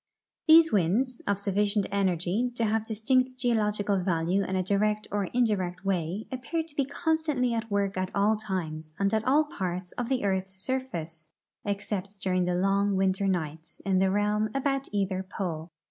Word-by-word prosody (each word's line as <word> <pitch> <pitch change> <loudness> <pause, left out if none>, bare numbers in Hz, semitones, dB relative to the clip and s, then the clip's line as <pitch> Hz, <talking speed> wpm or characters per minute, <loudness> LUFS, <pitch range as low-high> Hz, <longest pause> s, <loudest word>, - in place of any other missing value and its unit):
These 325 0 +8
winds, 215 +7 +1
of 200 -1 +2
sufficient 200 +1 +1
energy 195 +4 +1
to 230 - +1
have 220 0 0
distinct 255 +4 +1
geo 245 -1 +2
logical 210 -2 +1
value 180 +1 +1
in 190 - -2
a 185 - +1
direct 210 +2 +1
or 205 -1 0
indirect 195 -5 0
way, 185 +2 -1
appear 265 +6 -2
to 315 -2 -16
be 280 - +1
constantly 300 -4 0
at 230 0 -2
work 200 -1 0
at 185 0 -1
all 205 +2 +3
times 165 -7 -4
and 195 +1 +1
at 220 0 +2
all 290 +4 +5
parts 185 -8 -4
of 240 0 -2
the 260 -4 0
earth's 190 -1 -1
surface, 190 -9 -4 0.4
except 200 -1 -3
during 185 -1 +1
the 180 0 0
long 195 +2 +2
Avinter 190 +1 +1
nights 160 -3 -3
in 190 -1 +2
the 190 0 +3
realm 210 +2 +1
about 275 0 0
either 195 -2 0
pole. 175 -4 -4
200 Hz, 175 wpm, -28 LUFS, 185-230 Hz, 0.4 s, These